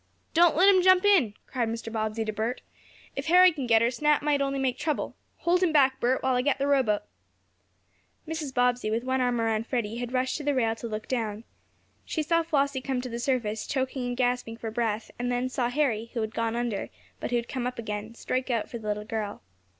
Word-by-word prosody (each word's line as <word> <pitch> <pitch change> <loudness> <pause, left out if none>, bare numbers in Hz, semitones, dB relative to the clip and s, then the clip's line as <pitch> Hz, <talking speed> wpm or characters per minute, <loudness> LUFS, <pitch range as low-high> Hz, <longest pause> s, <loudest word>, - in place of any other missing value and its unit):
"Don't 340 -1 +5
let 365 +5 +5
him 385 -2 +6
jump 370 +1 +5
in!" 320 - +4
cried 240 -4 -2
Mr. 230 0 -5
Bobbsey 220 0 -1
to 215 - -3
Bert. 225 +4 -3 0.5
"If 275 +2 -4
Harry 365 +2 +7
can 280 -6 -4
get 225 -1 +5
her, 235 - +2
Snap 295 +4 +2
might 290 -1 +2
only 275 0 0
make 260 -2 -1
trouble. 305 -1 -2 0.3
Hold 355 +1 +2
him 360 -3 +3
back, 270 -3 +4
Bert, 250 +2 +1
while 260 - +2
I 250 - +2
get 275 +1 +1
the 275 - 0
rowboat." 260 -7 +2 1.2
Mrs. 315 -3 -4
Bobbsey, 245 -3 +1
with 225 +2 -1
one 260 0 0
arm 245 -1 +1
around 225 0 0
Freddie, 230 -3 -2
had 245 0 -4
rushed 255 0 0
to 300 - -6
the 290 -1 +1
rail 225 -3 +2
to 235 - -5
look 215 -1 -5
down. 225 -4 -2 0.6
She 315 - -2
saw 335 +2 +2
Flossie 280 -4 0
come 260 -1 -2
to 250 - -6
the 235 0 -4
surface, 235 -4 -1
choking 260 -2 -2
and 245 0 -3
gasping 245 -2 0
for 225 -1 -5
breath, 225 -1 -2
and 245 0 -1
then 245 +1 0
saw 250 -1 -1
Harry, 245 -5 0
who 230 - 0
had 220 0 -3
gone 230 0 -1
under, 235 -4 -2 0.3
but - - -3
who 245 - 0
had 235 0 -1
come 250 -2 -3
up 250 - -5
again, 215 0 -5
strike 255 +2 -2
out 230 -3 0
for 235 - -5
the 215 - -8
little 210 0 -2
girl. 215 -2 -4
245 Hz, 230 wpm, -27 LUFS, 225-275 Hz, 1.2 s, Harry